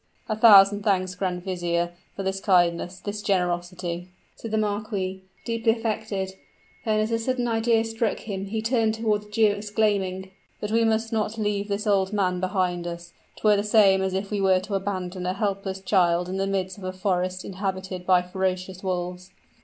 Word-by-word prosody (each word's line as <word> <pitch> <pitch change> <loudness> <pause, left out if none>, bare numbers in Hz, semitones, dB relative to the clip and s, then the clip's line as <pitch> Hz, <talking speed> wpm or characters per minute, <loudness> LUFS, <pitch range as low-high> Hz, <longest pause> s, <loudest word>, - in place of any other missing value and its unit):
"A 215 - -1
thousand 205 -2 +7
thanks, 185 -3 +1
grand 180 -1 -3
vizier, 175 -2 -1 0.2
for 195 - -4
this 190 0 -1
kindness 180 -2 +2
this 205 +1 -5
generosity!" 175 -2 -1 0.3
said 225 - -7
the 220 - 0
marquis, 205 -3 -2 0.2
deeply 230 -1 +2
affected; 215 -4 -3 0.5
then 215 -1 +2
as 215 +1 0
a 230 - +1
sudden 245 +1 -1
idea 225 0 +2
struck 225 -1 -1
him, 195 -2 -4
he 220 +2 -3
turned 225 -2 +2
toward 215 -2 0
the 210 - -16
Jew 215 0 +4
exclaiming, 205 -3 -1 0.3
"But 210 - -4
we 230 +1 +3
must 225 0 0
not 220 0 -1
leave 205 -1 -1
this 205 +1 -2
old 195 -1 +2
man 185 -3 +1
behind 185 -2 -1
us. 170 0 -7 0.2
'Twere 210 -1 +3
the 200 - 0
same 205 -3 +5
as 190 0 -1
if 195 +2 -3
we 205 -1 0
were 190 -1 +4
to 200 +2 -7
abandon 185 -2 -3
a 185 - 0
helpless 195 -1 -2
child 180 -3 +2
in 185 +1 -3
the 195 0 0
midst 190 0 -2
of - - -11
a 185 - -3
forest 185 -1 -1
inhabited 190 -1 -4
by 180 -1 +5
ferocious 185 0 -3
wolves." 180 -1 -3
195 Hz, 185 wpm, -25 LUFS, 185-215 Hz, 0.5 s, thousand